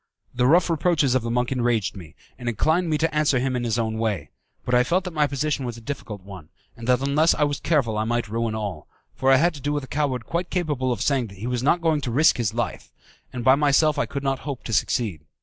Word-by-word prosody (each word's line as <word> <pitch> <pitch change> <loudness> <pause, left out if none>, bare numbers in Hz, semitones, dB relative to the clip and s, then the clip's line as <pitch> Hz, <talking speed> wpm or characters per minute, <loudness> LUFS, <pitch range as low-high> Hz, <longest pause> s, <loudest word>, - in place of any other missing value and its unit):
The 125 0 +2
rough 170 +5 +5
reproaches 165 -5 +2
of 130 - +2
the 115 - -4
monk 125 +1 0
enraged 120 -6 0
me, 85 -4 -11 0.2
and 120 -1 -2
inclined 160 - +1
me 155 - +1
to 160 0 -1
answer 150 -3 +3
him 130 +1 0
in 125 - -2
his 115 -1 0
own 110 -1 -1
way; 100 -10 -2 0.3
but 125 - -2
I 125 0 +5
felt 180 +8 +1
that 180 -2 -6
my 150 -2 +2
position 140 0 -2
was 120 -2 -5
a - - -9
difficult 110 -6 -7
one, 95 -6 -11 0.3
and 115 0 -9
that 125 0 +3
unless 145 +4 +3
I 150 - +1
was 145 -1 0
careful 135 -9 +1
I - - +1
might 120 +1 -1
ruin 115 +1 -2
all, 100 -8 -5 0.3
for 135 0 +2
I - - +7
had 170 +6 +3
to 145 - -10
do 145 - -1
with 145 -1 -2
a - - -8
coward 135 -5 -1
quite 175 +2 -3
capable 145 -8 -1
of 120 - -1
saying 135 -4 +1
that 100 -2 -13
he 105 - -7
was 125 -1 -1
not 160 +6 +2
going 160 -3 +1
to 130 - -3
risk 145 +7 +4
his 115 -3 -1
life, 120 -1 -3 0.4
and 125 -2 -5
by 130 - +6
myself 145 +1 +3
I - - 0
could 140 0 -5
not 135 -1 0
hope 140 -3 -6
to 115 - -5
succeed. 105 -7 0
130 Hz, 265 wpm, -24 LUFS, 115-150 Hz, 0.4 s, I